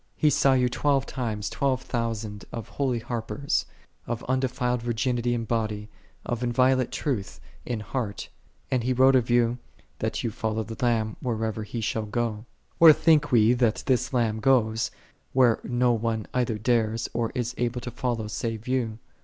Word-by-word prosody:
He 150 - +3
saw 135 -1 +4
you 125 -1 +3
twelve 140 +2 +1
times 110 -5 -3
twelve 135 -2 0
thousand 110 -4 -3
of 115 -3 -6
holy 130 -4 -1
harpers, 120 +4 -2 0.4
of 120 0 -3
undefiled 125 -1 0
virginity 120 +1 0
in 115 -1 -3
body, 110 -2 -2 0.4
of 120 -1 -2
inviolate 125 +1 +2
truth 120 -10 -3 0.3
in 120 -3 -2
heart; 105 -1 -4 0.4
and 125 -3 +1
he 130 +2 +1
wrote 130 +1 +5
of 125 -2 +2
you, 120 0 +2 0.4
that - - -2
ye 115 - -1
follow 110 0 -2
the 115 +2 -7
Lamb 110 -3 +1
whithersoever 110 -2 -2
He 115 +3 -5
shall 110 0 -2
go. 110 0 -2 0.3
Where 165 -2 +10
think 150 -1 +3
we 115 -1 +5
that 120 -3 +1
This 130 -1 +1
Lamb 115 -4 +1
goeth, 115 -3 +2 0.4
where 125 -3 +4
no 125 0 +2
one 110 -2 -1
either 120 -3 0
dares 115 0 +1
or 115 -1 -1
is 120 -1 -2
able 120 0 -1
to 120 - -6
follow 120 -3 -2
save 110 +1 -4
you 120 -4 -1
120 Hz, 165 wpm, -26 LUFS, 110-125 Hz, 0.4 s, Where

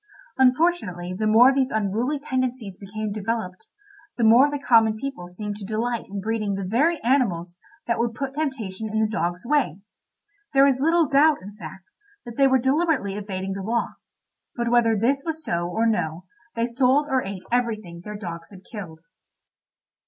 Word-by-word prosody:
Unfortunately 250 - +2
the 215 +3 -1
more 240 +5 +6
these 265 -1 +1
unruly 220 +7 -1
tendencies 255 -7 -3
became 210 +2 -5
developed, 210 -2 -4 0.5
the 240 - 0
more 235 +6 +6
the 290 - -2
common 225 -5 +4
people 265 -7 -6
seemed 205 +3 -6
to 210 - -9
delight 225 +3 -2
in 200 +1 -5
breeding 215 -1 -2
the 195 - -4
very 285 - +1
animals 190 -10 +1 0.3
that 235 - -1
would 230 -1 -1
put 270 +2 -4
temptation 225 -9 -3
in 220 +1 -1
the 220 - +2
dog's 180 -3 -3
way. 260 - +1 0.8
There 270 0 +7
is 270 -2 +2
little 325 +2 +3
doubt, 290 -3 +4
in 200 +2 -9
fact, 190 0 -11 0.3
that 235 -1 -8
they 275 +1 +5
were 265 0 +4
deliberately 270 - +1
evading 195 -2 -4
the 195 - -5
law; 230 +4 -1 0.7
but 235 -1 -1
whether 230 -2 +3
this 265 +6 +1
was 320 -1 -5
so 170 0 -1
or 220 +5 0
no 175 -6 -1 0.3
they 230 0 +1
sold 255 +4 +2
or 265 -3 +1
ate 195 -1 -6
everything 215 -8 -2
their 210 +1 -7
dogs 170 -4 -7
had 190 -2 -14
killed. 175 -8 -9
225 Hz, 175 wpm, -24 LUFS, 195-265 Hz, 0.8 s, There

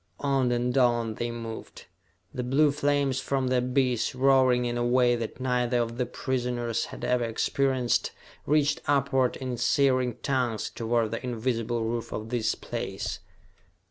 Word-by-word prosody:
On 135 -3 +1
and 120 +1 0
on 120 -3 +2
they 120 +2 -3
moved. 115 -1 -7 0.5
The 130 - -3
blue 140 +4 +3
flames 145 -2 +1
from 135 -2 -1
the 130 - +2
abyss, 125 -1 0
roaring 130 -2 +4
in 120 0 -2
a 120 - 0
way 120 0 +3
that 115 0 -5
neither 125 -1 +1
of 115 0 -1
the 125 - 0
prisoners 125 -3 -2
had - - -10
ever 125 -1 +1
experienced, 125 +2 0 0.4
reached 145 0 +2
upward 140 -3 +2
in 130 -2 -4
searing 130 -1 +2
tongues 125 -6 -1
toward 115 -1 0
the 115 - -4
invisible 120 -1 -1
roof 115 +1 -3
of 110 +1 -5
this 115 -2 0
place. - - -5
125 Hz, 150 wpm, -27 LUFS, 120-130 Hz, 0.5 s, roaring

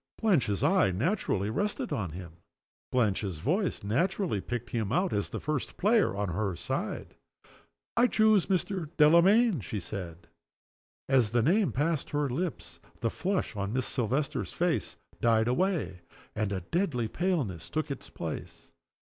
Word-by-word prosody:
Blanche's 145 - +2
eye - - +4
naturally 105 - 0
rested 205 - -1
on 105 - -2
him. 85 0 -9 0.5
Blanche's 100 -7 +1
voice 175 - -1
naturally 135 - 0
picked 120 +2 -5
him 110 -4 -1
out 180 +7 +1
as 100 - -1
the - - -4
first 150 -3 -3
player 210 - +3
on 100 -1 -1
her 95 +1 -1
side. - - -4 0.8
"I 240 +2 +5
choose 215 -5 +4
Mr. 185 -3 -1
Delamayn," 170 - +5
she 100 +3 -4
said. 85 -3 -7 0.8
As 130 -5 +4
the 120 +1 +2
name 190 - +3
passed 150 +2 0
her 145 -1 0
lips 165 +7 -4 0.2
the 115 - 0
flush 185 - -2
on 100 +1 -3
Miss 130 0 0
Silvester's 135 +3 -1
face - - -1 0.2
died 115 -1 +3
away, 155 - 0 0.3
and 105 -2 -1
a 95 -2 -2
deadly 125 - -1
paleness 130 - -2
took 155 -2 -2
its 135 - -6
place. - - -7
130 Hz, 145 wpm, -29 LUFS, -, 0.8 s, I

